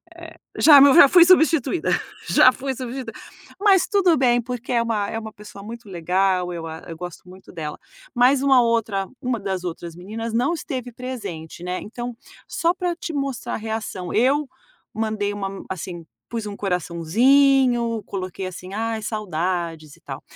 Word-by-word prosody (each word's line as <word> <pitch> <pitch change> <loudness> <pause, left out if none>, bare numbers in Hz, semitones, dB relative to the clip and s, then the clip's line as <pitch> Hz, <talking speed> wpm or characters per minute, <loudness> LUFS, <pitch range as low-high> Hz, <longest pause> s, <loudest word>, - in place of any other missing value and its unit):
eh, - - -12 0.2
já 290 -3 +8
meu 280 -1 +7
já 285 -4 +9
fui 350 +3 +7
substituída 325 -3 +3 0.4
já 255 - +6
fui 270 +1 -4
substituída, 250 -2 -6 0.5
mas 395 -3 +4
tudo 365 -6 +3
bem 245 -2 +3
porque 245 +1 -5
é 235 - +3
uma 215 -3 -1
é 225 - -4
uma 220 -1 -8
pessoa 205 -1 -12
muito 230 0 -9
legal, 180 +1 0
eu 165 -1 -6
a 160 0 -7
eu 165 - -7
gosto 180 0 -9
muito 185 +1 -14
dela, 155 -3 -5 0.4
mas 255 +3 +4
uma 265 -3 +5
outra 225 -5 0
uma 245 -3 -1
das 190 -2 -3
outras 170 -1 -6
meninas 220 +5 -6
não 250 +8 +1
esteve 255 -6 -5
presente, 215 -10 -7
né, 180 0 -3
então 240 +2 -6 0.3
só 340 +1 +1
para 355 -2 -2
te 335 -2 -6
mostrar 275 -3 -3
a - - -1
reação, 220 -5 -5
eu 275 +6 +2 0.5
mandei 215 -2 -2
uma 200 -1 -3
men 195 - -8
assim, 175 -2 -6 0.2
pus 230 -2 -4
um 205 -1 -6
coraçãozinho, 230 - +2
coloquei 185 -1 -5
assim, 185 +1 -8
ai 225 0 -2
saudades 175 -7 -3
e - - -25
tal. - - -8
225 Hz, 170 wpm, -22 LUFS, 185-260 Hz, 0.5 s, já